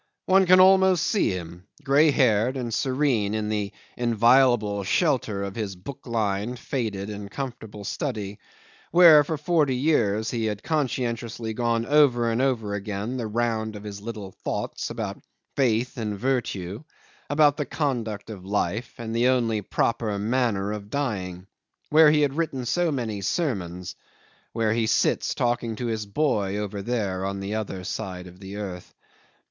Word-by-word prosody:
One 190 Hz, 0 st, +4 dB
can 185 Hz, +1 st, +7 dB
almost 190 Hz, -2 st, +5 dB
see 210 Hz, -, +2 dB
him, 90 Hz, 0 st, -6 dB, 0.2 s
grey 145 Hz, +3 st, +5 dB
haired 125 Hz, -2 st, +2 dB
and 120 Hz, -3 st, -3 dB
serene 130 Hz, -5 st, +1 dB
in 105 Hz, -1 st, -2 dB
the 105 Hz, -2 st, -2 dB, 0.2 s
inviolable 120 Hz, -3 st, +3 dB
shelter 110 Hz, -, +1 dB
of 100 Hz, -1 st, -4 dB
his 100 Hz, -3 st, -4 dB
book 120 Hz, +10 st, -10 dB
lined, 110 Hz, 0 st, -1 dB
faded, 105 Hz, -6 st, -3 dB
and 100 Hz, -1 st, -7 dB
comfortable 115 Hz, -5 st, -6 dB
study, 105 Hz, -3 st, -4 dB, 0.5 s
where 165 Hz, -3 st, +8 dB
for 155 Hz, +2 st, -3 dB
forty 150 Hz, -3 st, +1 dB
years 115 Hz, -7 st, +1 dB
he 115 Hz, -2 st, -1 dB
had 105 Hz, -1 st, -3 dB
conscientiously 120 Hz, -6 st, -2 dB
gone 115 Hz, 0 st, 0 dB
over 125 Hz, -5 st, +4 dB
and 115 Hz, +3 st, 0 dB
over 115 Hz, -6 st, 0 dB
again 105 Hz, +4 st, -3 dB
the 115 Hz, -3 st, -3 dB
round 110 Hz, -1 st, -1 dB
of 105 Hz, -, -8 dB
his 100 Hz, -1 st, -7 dB
little 105 Hz, -3 st, -6 dB
thoughts -, -, -4 dB
about 110 Hz, -4 st, -5 dB, 0.3 s
faith 125 Hz, -2 st, +1 dB
and 105 Hz, -2 st, -3 dB
virtue, 110 Hz, -, -2 dB, 0.5 s
about 145 Hz, -1 st, +4 dB
the 150 Hz, -, -1 dB
conduct 115 Hz, -8 st, -2 dB
of 95 Hz, -4 st, -9 dB
life 105 Hz, +4 st, -2 dB
and 115 Hz, -1 st, -5 dB
the 120 Hz, +2 st, +3 dB
only 115 Hz, -4 st, +2 dB
proper 110 Hz, +1 st, -1 dB
manner 105 Hz, -2 st, 0 dB
of 105 Hz, -1 st, -6 dB
dying; 95 Hz, -10 st, -3 dB, 0.5 s
where 155 Hz, 0 st, +7 dB
he 150 Hz, 0 st, +3 dB
had 140 Hz, -2 st, +2 dB
written 140 Hz, -5 st, -2 dB
so 175 Hz, +6 st, +1 dB
many 115 Hz, -7 st, -3 dB
sermons, 95 Hz, -, -2 dB, 0.6 s
where 110 Hz, -1 st, +1 dB
he 115 Hz, -1 st, +1 dB
sits -, -, +1 dB
talking 120 Hz, -2 st, 0 dB
to 120 Hz, -, -4 dB
his 110 Hz, -2 st, -2 dB
boy, 100 Hz, -5 st, 0 dB
over 105 Hz, -1 st, -4 dB
there, 100 Hz, -4 st, -2 dB
on 100 Hz, 0 st, -3 dB
the 100 Hz, +2 st, -4 dB
other 105 Hz, -4 st, -4 dB
side 90 Hz, -2 st, -5 dB
of 90 Hz, 0 st, -13 dB
the 95 Hz, 0 st, -8 dB
earth. 95 Hz, -4 st, -7 dB
115 Hz, 160 wpm, -25 LUFS, 100-130 Hz, 0.6 s, where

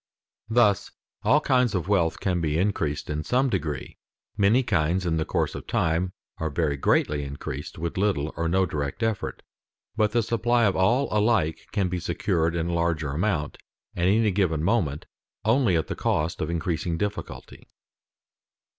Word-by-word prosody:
Thus 110 Hz, -4 st, +3 dB, 0.3 s
all 125 Hz, +8 st, +4 dB
kinds 125 Hz, -6 st, +2 dB
of 90 Hz, -2 st, -1 dB
wealth 90 Hz, -5 st, +1 dB
can 90 Hz, -3 st, 0 dB
be 75 Hz, -1 st, 0 dB
increased 80 Hz, -6 st, -1 dB
in 75 Hz, +1 st, -3 dB
some 130 Hz, -, +1 dB
degree; 75 Hz, -8 st, -3 dB, 0.4 s
many 105 Hz, +6 st, +4 dB
kinds 90 Hz, -4 st, +1 dB
in 80 Hz, -2 st, +1 dB
the 80 Hz, -, 0 dB
course -, -, -1 dB
of -, -, -8 dB
time 85 Hz, +3 st, 0 dB, 0.3 s
are 80 Hz, -, -1 dB
very 75 Hz, -1 st, 0 dB
greatly 70 Hz, +1 st, +1 dB
increased 70 Hz, 0 st, -6 dB
with 85 Hz, +3 st, -3 dB
little 90 Hz, -7 st, 0 dB
or 85 Hz, -, -1 dB
no 95 Hz, +2 st, +3 dB
direct 75 Hz, +4 st, -3 dB
effort, 110 Hz, -3 st, -2 dB, 0.5 s
but 105 Hz, -1 st, +2 dB
the 120 Hz, +1 st, +2 dB
supply 120 Hz, +2 st, +1 dB
of 100 Hz, -, +2 dB
all 120 Hz, +9 st, +3 dB
alike 105 Hz, -7 st, +1 dB
can 100 Hz, -3 st, +1 dB
be 90 Hz, 0 st, -2 dB
secured 85 Hz, -1 st, 0 dB
in 85 Hz, 0 st, -1 dB
larger 85 Hz, -3 st, 0 dB
amount 80 Hz, -1 st, -1 dB, 0.4 s
at 90 Hz, 0 st, +1 dB
any 105 Hz, +2 st, +3 dB
given 90 Hz, -5 st, +1 dB
moment 85 Hz, -8 st, 0 dB, 0.4 s
only 115 Hz, -4 st, +3 dB
at 80 Hz, -, 0 dB
the -, -, -4 dB
cost 80 Hz, +2 st, -1 dB
of 80 Hz, -, -1 dB
increasing 85 Hz, 0 st, -1 dB
difficulty. 105 Hz, +3 st, -5 dB
90 Hz, 165 wpm, -25 LUFS, 80-105 Hz, 0.5 s, all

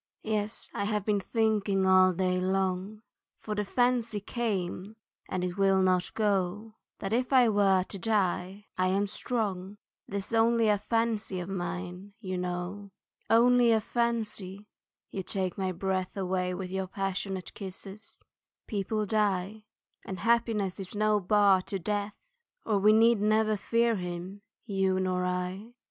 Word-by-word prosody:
Yes, 215 Hz, 0 st, -2 dB
I 200 Hz, -, -2 dB
have 210 Hz, -1 st, -1 dB
been 210 Hz, -2 st, +2 dB
thinking 210 Hz, -2 st, +1 dB
all 185 Hz, 0 st, +6 dB
day 185 Hz, 0 st, 0 dB
long, 190 Hz, +2 st, -1 dB, 0.3 s
For 215 Hz, -, -5 dB
the 210 Hz, 0 st, -1 dB
fancy 235 Hz, 0 st, +1 dB
came 200 Hz, -2 st, -3 dB, 0.3 s
and 185 Hz, -1 st, -2 dB
it 180 Hz, +1 st, -3 dB
will 195 Hz, -1 st, +4 dB
not 185 Hz, -1 st, +2 dB
go, 205 Hz, 0 st, 0 dB, 0.2 s
That 195 Hz, +2 st, -4 dB
if 250 Hz, +3 st, 0 dB
I 255 Hz, -3 st, +6 dB
were 195 Hz, -3 st, +3 dB
to 195 Hz, +1 st, -9 dB
die 195 Hz, -1 st, -1 dB
I 185 Hz, -, +3 dB
am 195 Hz, +2 st, +1 dB
strong, 205 Hz, -3 st, -3 dB, 0.3 s
'Tis 200 Hz, +2 st, -4 dB
only 230 Hz, 0 st, +4 dB
a 205 Hz, -1 st, +3 dB
fancy 225 Hz, -3 st, -1 dB
of 175 Hz, +1 st, -5 dB
mine, 180 Hz, +1 st, -5 dB
you 185 Hz, -4 st, -4 dB
know. 180 Hz, +3 st, -4 dB, 0.4 s
Only 240 Hz, +1 st, +5 dB
a 220 Hz, -, +4 dB
fancy 215 Hz, -4 st, -2 dB, 0.5 s
(you 195 Hz, -, -3 dB
take 185 Hz, -1 st, -2 dB
my 190 Hz, -1 st, -1 dB
breath 185 Hz, +1 st, -2 dB
With 185 Hz, -1 st, -2 dB
your 190 Hz, 0 st, -2 dB
passionate 195 Hz, -1 st, -3 dB
kisses) 195 Hz, +2 st, -9 dB, 0.4 s
people 210 Hz, +1 st, -2 dB
die, 210 Hz, 0 st, 0 dB, 0.4 s
And 185 Hz, -2 st, -6 dB
happiness 225 Hz, -4 st, +1 dB
is 190 Hz, +1 st, -7 dB
no 215 Hz, 0 st, +2 dB
bar 200 Hz, 0 st, +4 dB
to 195 Hz, -, -2 dB
death 205 Hz, +2 st, -2 dB, 0.5 s
Or 210 Hz, -3 st, +2 dB
we 210 Hz, +2 st, +6 dB
never 215 Hz, -1 st, +4 dB
need 210 Hz, -, 0 dB
fear 230 Hz, +1 st, +2 dB
him, 180 Hz, +2 st, -6 dB, 0.2 s
you 195 Hz, -3 st, +1 dB
nor 185 Hz, -1 st, 0 dB
I. 180 Hz, +5 st, -3 dB
200 Hz, 145 wpm, -29 LUFS, 185-215 Hz, 0.5 s, all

